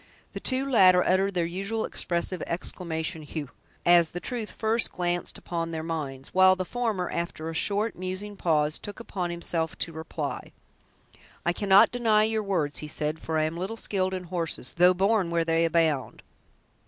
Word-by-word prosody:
The - - -5
two 265 +1 +1
latter 185 -8 +6
uttered 190 +1 +2
their 175 -1 +1
usual 195 +6 -2
expressive 175 +1 -2
exclamation, 165 -1 -3
"hugh!" 150 -3 -6 0.3
as 175 -2 +6
the 175 - -5
truth 230 +1 -4
first 225 +1 0
glanced 175 0 -2
upon 165 -1 -3
their 160 -1 -4
minds, 145 -5 -5
while 185 0 +6
the 185 0 -3
former, 220 -5 -2
after 165 -1 -3
a - - -7
short, 205 +6 0
musing 185 +3 -5
pause, 155 -4 +1
took 205 - -8
upon 185 -6 -4
himself 170 -1 -2
to 165 - -3
reply. 160 -2 -5 0.9
"I 175 - +2
cannot 195 +1 +5
deny 225 -3 +3
your 220 0 0
words," 175 -8 -1
he 150 - -6
said, 150 +1 -3
"for 160 0 -2
I 155 - +2
am 160 +2 -2
little 195 +6 -4
skilled 190 -3 -1
in 185 - -5
horses, 170 -7 -1
though 180 +1 +6
born 195 -1 +2
where 170 -1 +1
they 165 0 +2
abound. 160 -5 0
175 Hz, 175 wpm, -27 LUFS, 165-195 Hz, 0.9 s, latter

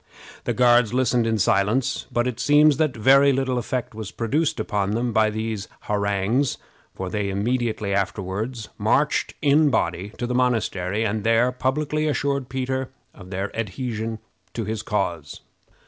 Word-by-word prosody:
The - - -1
Guards 120 -2 +4
listened 125 -2 +2
in 115 -1 +1
silence; 105 +6 +1
but 120 0 +1
it 125 -2 -3
seems 145 +2 +5
that 155 -6 0
very 135 +5 +6
little 130 -2 0
effect 125 +1 -3
was 110 -2 -6
produced 150 - -1
upon 100 0 -1
them 120 0 -1
by 110 0 +3
these 110 -1 -4
harangues, 105 +6 0 0.4
for 95 - -4
they 105 -2 -1
immediately 110 0 -1
afterward 100 +4 -2 0.2
marched 125 +8 +1
in 150 +2 +5
a - - +4
body 90 -5 -1
to 120 - -2
the 125 - -2
monastery, 110 -5 0
and 105 0 -1
there 115 +2 +3
publicly 150 +4 -1
assured 140 -3 -1
Peter 130 0 -2 0.2
of 90 -2 -13
their 95 +1 -4
adhesion 115 0 -3 0.4
to 115 - -2
his 110 +1 -3
cause. 90 -9 -3
115 Hz, 155 wpm, -23 LUFS, 105-130 Hz, 0.4 s, very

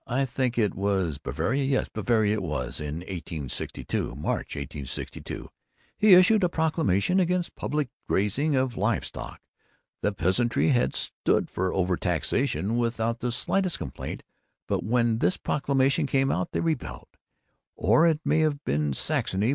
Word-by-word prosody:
I 135 +2 +1
think 125 -1 -1
it 105 -5 +2
was 95 -6 -1
Bavaria 135 +3 -1
yes, 135 0 +1
Bavaria, 110 -1 +1
it - - -3
was 70 -6 -3
in 75 +2 -4
1862, 80 -9 -4
March, 70 - -3
1862, 70 -1 -6 0.5
he 210 -3 +7
issued 190 +3 +6
a 180 - +3
proclamation 160 - +1
against 180 -1 0
public 150 -2 -1 0.2
grazing 135 +10 +1
of 130 -2 0
live 105 +3 +1
stock. - - -8 0.6
The 105 - +1
peasantry 100 - +2
had 125 -4 +2
stood - - 0
for 95 +1 -1
overtaxation 95 - 0
without 115 -1 0
the 125 - -1
slightest 180 +9 0
complaint, - - -6 0.4
but - - -1
when 115 0 +1
this 90 - +2
proclamation 140 +1 +1
came 135 0 +2
out, 90 - -1
they - - -1
rebelled. 160 -5 -3 0.7
Or 120 - +4
it 160 -2 +1
may 150 +2 +3
have 150 -2 +1
been 75 0 0
Saxony. 95 - 0
120 Hz, 145 wpm, -26 LUFS, 95-140 Hz, 0.7 s, he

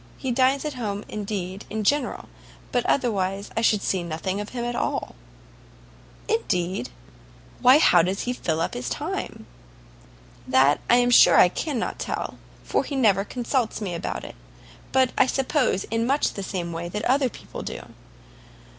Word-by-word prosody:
He 265 - -3
dines 260 +3 +2
at 300 - -2
home, 210 -5 -4
indeed, 200 -2 -5
in 220 0 -3
general, 280 +3 0 0.4
but 245 - +1
otherwise 200 -6 0
I 225 - +1
should 215 -3 +2
see 190 - 0
nothing 175 +4 -3
of 205 - -7
him 240 -1 -4
at 240 0 -3
all." - - -2 1.1
"Indeed? 175 -6 -1 0.7
why, 255 +3 +7
how 180 - +6
does 185 +4 -1
he 245 - -2
fill 165 -9 -2
up - - -1
his 120 -1 -4
time?" - - -4 1.0
"That 130 +3 +4
I 240 - +7
am 245 0 +3
sure - - +7
I 180 - +7
cannot 270 - -3
tell, - - -4 0.2
for - - 0
he 285 - -5
never 205 -7 +3
consults 245 +1 -2
me 195 -5 -4
about 170 - -4
it; - - -8 0.6
but 260 -1 +3
I - - +5
suppose 260 -6 0
much 235 +6 +1
in - - -11
the 200 - -5
same 180 -3 -4
way 170 +1 -4
that 210 +4 -4
other 265 +1 +2
people - - -9
do." - - -6
215 Hz, 165 wpm, -24 LUFS, 185-250 Hz, 1.1 s, why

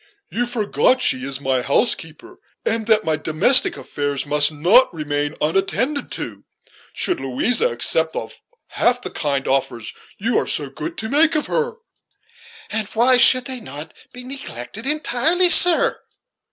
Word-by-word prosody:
You 245 +1 -2
forget 230 -4 -4
that - - -10
she 130 - +1
is 135 0 -4
my 130 -2 -1
housekeeper, 195 - -2 0.3
and 225 -1 -2
that 220 -1 +3
my 155 -1 -1
domestic 245 - +3
affairs 145 -1 -4
must 145 0 +2 0.4
remain 145 -2 -4
unattended 195 - -1
to, - - -7 0.5
should 360 - -1
Louisa 220 - 0
accept - - 0
of - - -7 0.3
half 245 0 0
the - - -6
kind 140 -3 -3
offers 120 -4 -2 0.2
you 230 +5 0
are - - -4
so - - 0
good 330 - -6
as - - -33
to 220 - -5
make 310 +4 +3
her." 465 +10 -2 1.0
"And 215 -1 -2
why 250 +3 +5
should 255 +1 +6
they 260 -1 -5
not 150 - -9 0.2
be 250 0 -11
neglected 240 - -8
entirely, 310 +4 +2
sir?" 355 -1 +5
220 Hz, 150 wpm, -19 LUFS, -, 1.0 s, should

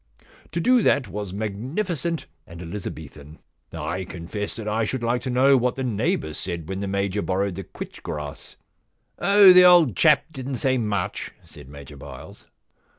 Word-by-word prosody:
To 170 - -1
do 250 +7 +4
that 135 - +2
was 105 -2 -5
magnificent 135 - -3 0.2
and 85 0 -11
Elizabethan. 80 -5 -8 0.3
I 95 - -4
confess 95 +3 -6
that 110 -2 -7
I 110 +2 0
should 120 +3 -3
like 120 +1 0
to 130 - -4
know 130 +2 +4
what 125 0 0
the 135 - -3
neighbour 125 - -1
said 85 -1 -5
when 95 +1 -4
the 100 - -3
Major 100 +1 -1
borrowed 95 +1 -1
the 95 +2 -6
quitch - - -10
grass.* 75 -1 -7 0.3
* - - -38
Oh, 200 -2 +7
the 180 0 +8
old 175 - +6
chap 155 -2 +4
didn*t 130 -1 -5
say 130 +1 +1
much,' 100 -5 -2 0.2
said 65 - -14
Major 70 0 -11
Byles. 70 -2 -12
105 Hz, 170 wpm, -24 LUFS, 90-135 Hz, 0.3 s, the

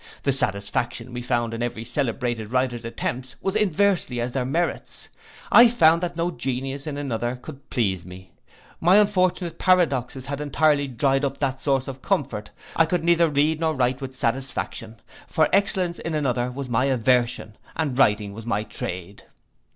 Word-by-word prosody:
The 140 - +2
satisfaction 120 0 -2
we 120 - -4
found 120 -1 -1
in 115 - -4
every 120 -2 -3
celebrated 120 -4 -2
writer's 125 -2 0
attempts, 125 +2 -4
was 195 +1 -2
inversely 195 - +1
as 120 +1 -2
their 125 0 -1
merits. 165 +7 -2 0.4
I 240 +1 +9
found 170 -8 +4
that 175 -1 -3
no 170 +1 0
genius 135 +1 -3
in 145 -2 -4
another 120 -3 -2
could 140 +2 -12
please 95 -7 0
me. 90 +1 -12 0.5
My 175 +3 +5
unfortunate 185 -4 +2
paradoxes 140 -9 +2
had 140 +1 -4
entirely 150 -1 +2
dried 135 +2 +1
up 140 -1 -1
that 135 0 -2
source 135 -2 +1
of 135 -1 -7
comfort. 140 - -1 0.3
I 165 - +4
could 175 0 0
neither 170 -1 +4
read 150 +2 +2
nor 160 -1 0
write 130 +1 0
with 130 -1 -6
satisfaction; 120 -2 -3 0.3
for 155 -1 +2
excellence 185 -3 +2
in 165 -1 -3
another 125 -4 0
was 135 +1 -6
my 125 +2 +1
aversion, 125 -3 +1 0.2
and 150 -5 -1
writing 105 -6 +2
was 115 +2 -9
my 105 -2 0
trade. 95 -2 -7
135 Hz, 165 wpm, -24 LUFS, 120-160 Hz, 0.5 s, I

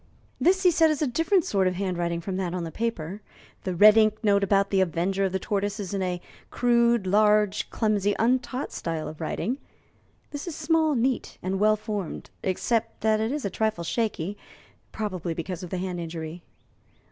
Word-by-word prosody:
"This" 380 +2 +3
he 360 - +6
said, 320 -1 +4
"is 310 -1 0
a - - +3
different 325 - +2
sort 195 -2 +2
of 180 - 0
handwriting 175 -3 -2
from 190 +2 -4
that 180 -2 -2
on 180 - -2
the 165 - -5
paper. 205 -3 -3 0.4
The 185 -2 -2
red 210 +4 +8
ink 215 0 +3
note 200 -1 +3
about 200 0 +2
the 195 -1 +3
avenger 190 +2 0
of 190 - -1
the 190 - 0
tortoise 205 +2 -2
is 200 -2 -5
in 195 - -1
a 180 -1 -1 0.3
crude, 235 -3 +3
large, 210 +1 +3
clumsy, 205 -2 +1
untaught 250 +3 0
style 165 -2 -3
of 155 +1 -9
writing. 240 - -2 0.7
This 290 +3 -6
is 335 - -4
small, 315 -1 +2
neat, 250 +1 -1
and 190 +1 -1
well 215 +1 +4
formed 210 -5 -5
except 225 +4 -1
that 220 0 +2
it 220 +2 0
is 290 -4 -3
a 200 - -2
trifle 215 -4 -1
shaky, 205 -1 -2 0.5
probably 185 -6 -3
because 170 +1 -5
of 180 - -7
the 185 - -3
hand 180 -1 -3
injury." 165 0 -6
205 Hz, 190 wpm, -26 LUFS, 180-230 Hz, 0.7 s, red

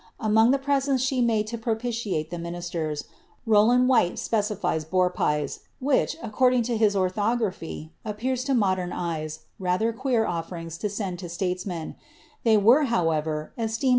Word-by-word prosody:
Among 220 +1 +4
the 275 - +4
presents 275 -1 +1
slie 255 -1 +1
made 220 -3 +2
to 230 +2 -5
propitiate 225 -8 -2
llie 175 -1 -4
ministers, 170 -3 -4 0.4
Rowland 230 +3 +5
Whyte 230 -9 +3
specifies 210 -7 -1
boar 180 +3 +1
pics, 150 -4 -1 0.2
which, 280 +3 +1
according 250 +2 +2
lo 240 - 0
his 215 -2 +3
orlhograpliy, 190 -4 -1
appear 225 +5 -2
to 260 +2 0
modern 185 -5 +1
eves 160 -2 -4 0.2
rather 190 +5 +1
queer 245 -2 +1
oflbrings 165 -1 -5
to 210 - -1
send 195 -3 -4
to 175 -2 -7
statesmen; 180 -1 -3 0.5
ihcy 220 -2 +5
were, 260 +8 +6
however, 160 - 0
esteemei! 225 +4 0
210 Hz, 145 wpm, -25 LUFS, 175-235 Hz, 0.5 s, were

